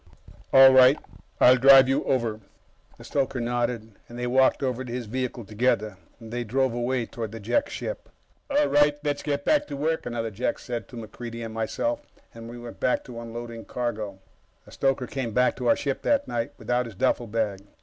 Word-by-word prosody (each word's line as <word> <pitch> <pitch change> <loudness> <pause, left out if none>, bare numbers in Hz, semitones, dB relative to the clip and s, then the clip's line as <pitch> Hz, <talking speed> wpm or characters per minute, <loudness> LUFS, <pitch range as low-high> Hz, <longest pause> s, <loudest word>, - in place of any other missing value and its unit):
"All 135 0 +9
right. 130 +2 +7 0.4
I'll 125 +1 +7
drive 135 0 +8
you 135 - +1
over." 115 -4 0 0.6
The - - -13
stoker 135 -2 -1
nodded, 120 -1 -2 0.2
and 120 - -9
they 125 - -3
walked 130 +3 +3
over 130 -1 -1
to 125 - -8
his 120 0 -4
vehicle 125 0 -4
together. 110 -1 0 0.2
They 120 +1 -5
drove 130 +2 0
away, 120 0 -1
toward 115 -2 -6
the 115 - -7
Jek 275 - 0
ship. - - -6 0.4
"All 290 +1 +3
right, 145 - +3
let's 145 -1 -1
get 145 -1 -2
back 300 - +2
to 145 - -6
work," 160 +3 -1
another 115 -1 -3
Jek 110 +5 -2
said 120 -4 -6
to - - -12
MacReidie 115 +1 -7
and 110 - -7
myself, 200 - -2 0.3
and 115 0 -10
we 120 - -9
went 120 0 -10
back 125 - +1
to 120 -2 -9
unloading 115 0 -7
cargo. 110 -5 -4 0.5
The - - -16
stoker 135 -2 0
came 125 -4 -4
back 125 +2 +2
to 125 - -3
our - - +5
ship 140 -2 -3
that 285 -1 +1
night, 115 -1 -3
without 125 0 -1
his 110 - -11
duffelbag. 110 -3 -1
120 Hz, 190 wpm, -25 LUFS, 115-135 Hz, 0.6 s, All